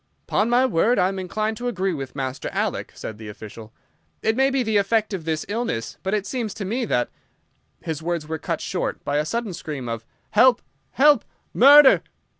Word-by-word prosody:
"'Pon 215 - +1
my 245 +2 +4
word, 235 +2 +2
I 185 0 +3
am 195 0 -4
inclined 215 +4 -2
to 245 - -4
agree 195 -5 -1
with 135 -4 -6
Master 130 -1 -4
Alec," - - -2
said 110 -1 -7
the 110 - -9
official. 110 +1 -10 0.5
"It 220 0 +2
may 270 +2 +3
be 270 -2 0
the 220 -2 +1
effect 215 +2 +1
of 175 -5 -5
this 160 -1 -2
illness, 205 - -3
but 190 +2 -1
it 205 -2 -2
seems 220 -1 -3
to 205 - -5
me 235 +6 -1
that—" 120 - 0 0.7
His 160 -2 -4
words 170 -2 -3
were 160 0 -4
cut - - -3
short - - -3
by 145 - 0
a 150 - +1
sudden 230 +2 -3
scream 150 -6 -6
of 115 -1 -4 0.3
"Help! 240 +3 +5 0.3
Help! 290 -2 +5 0.3
Murder!" 280 +2 +8
195 Hz, 200 wpm, -23 LUFS, 150-235 Hz, 0.7 s, Murder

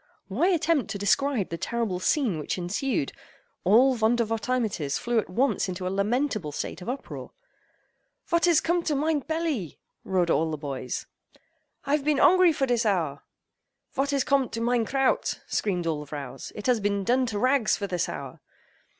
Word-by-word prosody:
Why 260 - +2
attempt 330 - +2
to 215 - -3
describe 215 +2 +1
the 165 - -5
terrible 230 -6 -2
scene 215 - +1
which 150 - -3
ensued? 185 - -1 0.5
All 250 +8 +5
Vondervotteimittiss 225 - 0
flew 240 -1 +1
at 210 - -4
once 235 +1 +1
into 185 0 -4
a 185 - -1
lamentable 215 - 0
state 160 - -5
of 180 - -6
uproar. 265 +2 -6 1.0
"Vot 340 0 +2
is 335 -3 +5
cum'd 345 +1 0
to 300 - +2
mein 300 +1 +1
pelly?" 310 - -2 0.3
roared 180 -3 +1
all 160 +1 +2
the 155 - -3
boys—"I've 145 - -6
been 300 0 +2
ongry 365 +3 +6
for 280 -3 0
dis 245 -2 +1
hour!" 165 -10 0 0.7
"Vot 275 0 0
is 275 -2 +2
com'd 275 -3 +1
to 230 - -2
mein 235 0 +1
kraut?" 270 +1 +1
screamed 180 -5 -1
all 160 -2 -1
the 150 - -8
vrows, 140 -3 -7
"It 210 - -7
has 250 -3 +3
been 200 -1 0
done 250 +5 +2
to 215 -3 -3
rags 255 0 +2
for 200 - -3
this 180 -3 -1
hour!" - - -7
230 Hz, 170 wpm, -26 LUFS, 185-275 Hz, 1.0 s, ongry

